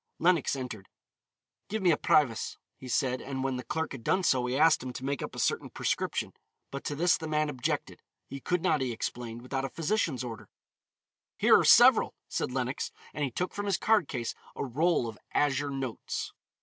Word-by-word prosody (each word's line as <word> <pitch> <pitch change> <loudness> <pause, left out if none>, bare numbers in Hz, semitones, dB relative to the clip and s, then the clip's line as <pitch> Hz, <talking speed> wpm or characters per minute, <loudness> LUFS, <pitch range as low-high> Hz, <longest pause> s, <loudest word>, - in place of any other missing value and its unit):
Lenox 170 -4 +2
entered. 125 -7 -6 0.8
"Give 215 -1 -2
me 180 - +5
a - - +4
Privas," 130 -8 +2 0.2
he 130 - -11
said, 125 +1 0
and 135 -1 -4
when 135 -1 -1
the 125 - -5
clerk 160 +5 -3
had 130 -4 -8
done 185 +9 +2
so, 125 -6 +2
he 125 +2 -1
asked 155 +1 +5
him 130 0 -5
to 130 - -6
make 140 0 -2
up - - -6
a - - -9
certain - - 0
prescription. - - -2 0.4
But 140 - -5
to 145 - -2
this 175 +4 +3
the 160 - -6
man 155 -1 +1
objected; 130 -4 -3 0.3
he 140 - -7
could 180 +5 -1
not, 150 - +2
he 130 -2 -1
explained, 120 0 -5
without 135 +1 -3
a 135 - -2
physician's 165 - -1
order. 115 -2 -7 0.9
"Here - - +6
are - - +5
several," - - +7
said - - -2
Lenox, 130 +1 -2 0.2
and 150 - -2
he 140 - 0
took 180 +9 -3
from 205 0 -4
his 195 -3 +2
card 215 -8 +3
case 120 -3 -3 0.2
a - - -3
roll 150 +1 +1
of 110 -2 -8 0.2
azure 145 0 +2
notes. 135 -4 -4
135 Hz, 200 wpm, -29 LUFS, 125-160 Hz, 0.9 s, several